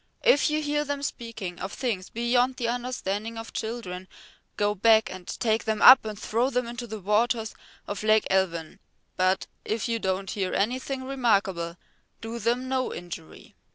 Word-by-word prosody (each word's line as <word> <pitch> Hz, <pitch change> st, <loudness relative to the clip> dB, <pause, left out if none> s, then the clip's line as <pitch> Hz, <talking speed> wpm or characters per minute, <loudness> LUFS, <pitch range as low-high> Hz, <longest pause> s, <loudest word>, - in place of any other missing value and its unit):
If -, -, +5 dB
you 305 Hz, +1 st, 0 dB
hear 295 Hz, 0 st, 0 dB
them 285 Hz, -1 st, -3 dB
speaking 230 Hz, -9 st, -5 dB
of 190 Hz, -, -4 dB
things 210 Hz, -8 st, -2 dB
beyond 245 Hz, +2 st, +1 dB
the 235 Hz, -, -2 dB
understanding 230 Hz, -3 st, -3 dB
of 225 Hz, 0 st, -8 dB
children, 195 Hz, -5 st, -5 dB, 0.5 s
go 205 Hz, 0 st, +2 dB
back 220 Hz, +2 st, +4 dB
and 185 Hz, -1 st, -9 dB
take 220 Hz, -1 st, 0 dB
them 220 Hz, -1 st, 0 dB
up 255 Hz, +1 st, +9 dB
and 215 Hz, -1 st, -5 dB
throw 230 Hz, +4 st, 0 dB
them 250 Hz, -2 st, 0 dB
into 240 Hz, +1 st, -6 dB
the 220 Hz, -1 st, -6 dB
waters 220 Hz, +3 st, +1 dB, 0.3 s
of 205 Hz, -, -4 dB
Lake 215 Hz, 0 st, +4 dB
Elvyn. 170 Hz, -4 st, 0 dB, 0.4 s
But 185 Hz, +1 st, +2 dB, 0.2 s
if 220 Hz, +1 st, -2 dB
you 230 Hz, -1 st, 0 dB
don't 190 Hz, -1 st, -1 dB
hear 190 Hz, -3 st, -2 dB
anything 255 Hz, +5 st, -1 dB
remarkable, 200 Hz, -10 st, 0 dB, 0.4 s
do 225 Hz, +1 st, -6 dB
them 240 Hz, +4 st, 0 dB
no 260 Hz, -1 st, 0 dB
injury." 175 Hz, -2 st, -9 dB
225 Hz, 165 wpm, -27 LUFS, 195-245 Hz, 0.5 s, up